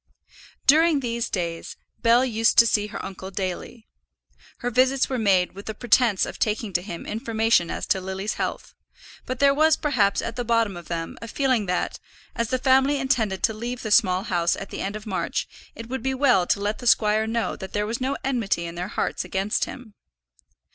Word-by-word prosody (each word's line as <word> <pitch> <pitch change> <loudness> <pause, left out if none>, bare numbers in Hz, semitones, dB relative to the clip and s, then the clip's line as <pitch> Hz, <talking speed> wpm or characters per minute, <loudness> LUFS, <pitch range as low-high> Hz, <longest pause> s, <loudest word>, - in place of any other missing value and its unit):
During 315 +1 +5
these 235 -1 -2
days, 170 -3 -4 0.2
Bell 235 +2 +4
used 225 -2 +1
to 230 - +9
see 210 -2 +1
her - - -6
uncle 190 0 -7
daily. 195 +3 -5 0.7
Her 245 - -3
visits 260 +2 +2
were 260 -2 -1
made 190 -4 +3
with 200 +2 -11
the 220 - -4
pretence 235 -3 +3
of - - -8
taking 210 -1 -1
to 175 - +1
him 175 -3 -7
information 225 -4 +1
as - - -4
to 190 - +1
Lily's 190 +2 -3
health; - - -4 0.5
but 255 - -3
there 280 +1 +4
was 310 +2 +4
perhaps 245 -10 +1
at 230 - -4
the 245 - -1
bottom 230 -4 +1
of 175 -1 -10
them 165 -1 -5
a 230 - -7
feeling 255 -4 0
that, 180 0 -2 0.4
as 230 -2 -1
the 255 - +1
family 265 +2 +3
intended 225 -8 0
to 220 - +3
leave 240 +3 -5
the 215 - -4
Small 185 -2 +4
House 175 -5 +1
at 195 - -8
the - - -5
end 200 +2 -3
of 215 +1 -7
March, 195 -4 -2 0.3
it 230 - -8
would 260 +1 -4
be 265 +2 -1
well 250 -10 +3
to - - +1
let 205 +1 -2
the 245 - -5
squire 215 -1 +3
know 230 0 -1
that 190 -1 -9
there 210 0 0
was 230 +4 -4
no 265 +2 -1
enmity 230 -10 -1
in 170 - -6
their 175 +1 -4
hearts - - -2
against 195 +2 -1
him. 245 -5 -10
220 Hz, 205 wpm, -24 LUFS, 195-250 Hz, 0.7 s, to